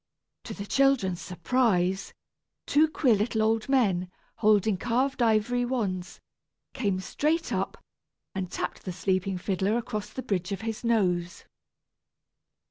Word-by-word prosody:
To -, -, -6 dB
the 200 Hz, -, -6 dB
children's 240 Hz, -8 st, +2 dB
surprise, 185 Hz, 0 st, 0 dB, 0.5 s
two 305 Hz, +2 st, +4 dB
queer 275 Hz, -5 st, +2 dB
little 220 Hz, +1 st, +1 dB
old 225 Hz, +2 st, +1 dB
men, 195 Hz, -10 st, +2 dB, 0.3 s
holding 210 Hz, -1 st, +3 dB
carved 250 Hz, +7 st, 0 dB
ivory 235 Hz, +2 st, +2 dB
wands, 190 Hz, -8 st, -2 dB, 0.5 s
came 200 Hz, -8 st, 0 dB
straight 310 Hz, -, -1 dB
up, -, -, -2 dB, 0.6 s
and 185 Hz, -2 st, -4 dB
tapped -, -, -4 dB
the 185 Hz, -, -3 dB
sleeping 185 Hz, +1 st, 0 dB
fiddler 195 Hz, +4 st, 0 dB
across 215 Hz, -3 st, -4 dB
the 260 Hz, -, -6 dB
bridge 185 Hz, -1 st, -2 dB
of 195 Hz, 0 st, -3 dB
his 225 Hz, +1 st, -4 dB
nose. 180 Hz, -7 st, 0 dB
210 Hz, 130 wpm, -27 LUFS, 185-245 Hz, 0.6 s, two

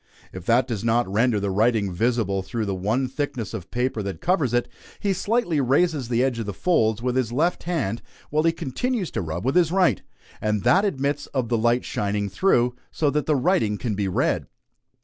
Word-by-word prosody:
If 90 Hz, 0 st, -9 dB
that 120 Hz, +2 st, +3 dB
does 115 Hz, -5 st, -3 dB
not 115 Hz, +1 st, +2 dB
render 110 Hz, +3 st, +2 dB
the 100 Hz, -1 st, -1 dB
writing 105 Hz, -1 st, +2 dB
visible 110 Hz, -1 st, 0 dB
through 110 Hz, +4 st, -3 dB
the 100 Hz, -, -2 dB
one 110 Hz, +8 st, 0 dB
thickness 130 Hz, -5 st, -4 dB
of 95 Hz, -4 st, -6 dB
paper 125 Hz, -2 st, -1 dB
that 100 Hz, -1 st, -5 dB
covers 170 Hz, -8 st, +1 dB
it, 120 Hz, 0 st, +1 dB, 0.3 s
he 200 Hz, -2 st, +1 dB
slightly 190 Hz, -6 st, 0 dB
raises 140 Hz, 0 st, +1 dB
the 120 Hz, +1 st, +2 dB
edge 130 Hz, -3 st, 0 dB
of 110 Hz, -, -4 dB
the 100 Hz, -, -4 dB
folds 115 Hz, -10 st, +1 dB
with 125 Hz, 0 st, 0 dB
his 125 Hz, -3 st, 0 dB
left 160 Hz, +9 st, 0 dB
hand 140 Hz, -, -1 dB, 0.3 s
while 155 Hz, +1 st, +2 dB
he 165 Hz, +1 st, +3 dB
continues 185 Hz, -, -2 dB
to -, -, -2 dB
rub 85 Hz, +3 st, -4 dB
with 135 Hz, -, +2 dB
his 170 Hz, -3 st, +3 dB
right; 185 Hz, -1 st, +3 dB, 0.4 s
and 105 Hz, -2 st, 0 dB
that 195 Hz, +3 st, +4 dB
admits 145 Hz, -5 st, -1 dB
of 125 Hz, -4 st, 0 dB
the 120 Hz, -, +2 dB
light 120 Hz, +2 st, +2 dB
shining 100 Hz, 0 st, -1 dB
through, 125 Hz, -, +2 dB
so 150 Hz, -3 st, 0 dB
that 150 Hz, 0 st, -1 dB
the 155 Hz, -, +3 dB
writing 125 Hz, -, +1 dB
can 115 Hz, -1 st, -2 dB
be 100 Hz, -1 st, -1 dB
read. 95 Hz, -, 0 dB
120 Hz, 210 wpm, -24 LUFS, 105-150 Hz, 0.4 s, that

